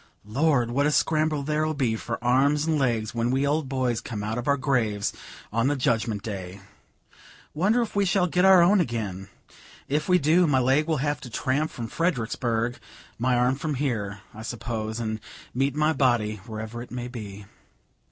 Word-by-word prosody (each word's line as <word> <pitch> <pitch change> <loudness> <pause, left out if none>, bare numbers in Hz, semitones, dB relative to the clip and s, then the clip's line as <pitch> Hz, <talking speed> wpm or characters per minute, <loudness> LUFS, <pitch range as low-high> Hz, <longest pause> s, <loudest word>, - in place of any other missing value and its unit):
Lord! 125 +1 +1
what 140 +4 +2
a - - +2
scramble 155 -1 +1
there'll 155 +1 0
be 125 -6 +1
for 115 +1 -4
arms 140 +5 +3
and 160 -2 +1
legs, 115 -5 0
when 115 0 0
we 135 +2 +1
old 145 -1 0
boys 130 -3 0
come 105 -4 -5
out 110 +3 -2
of 120 - -6
our 140 0 +3
graves, 115 -7 0 0.4
on 115 +3 +2
the 145 - +1
Judgment 115 -6 0
Day: 95 -3 -6 0.9
wonder 210 +9 +2
if 225 - -7
we 200 - +3
shall 195 -1 +2
get 180 +1 +1
our 190 -2 +7
own 195 +2 +5
again? 105 - -3 0.6
If 150 +5 -1
we 180 - +6
do, 165 +3 +4
my 140 -3 +3
leg 135 +5 +2
will 160 -2 +1
have 145 0 -1
to 125 - -8
tramp 135 +6 0
from 120 - -6
Fredericksburg, 120 -5 -1 0.4
my 125 +1 +2
arm 125 +1 +3
from 150 +1 -2
here, 110 -8 -2
I 110 - -9
suppose, 110 -1 -4
and 110 -1 -3 0.3
meet 135 +2 0
my 155 +1 +2
body, 120 -7 +1
wherever 110 +1 -6
it 120 - -9
may 125 0 -5
be." 105 -5 -8
125 Hz, 185 wpm, -26 LUFS, 115-150 Hz, 0.9 s, our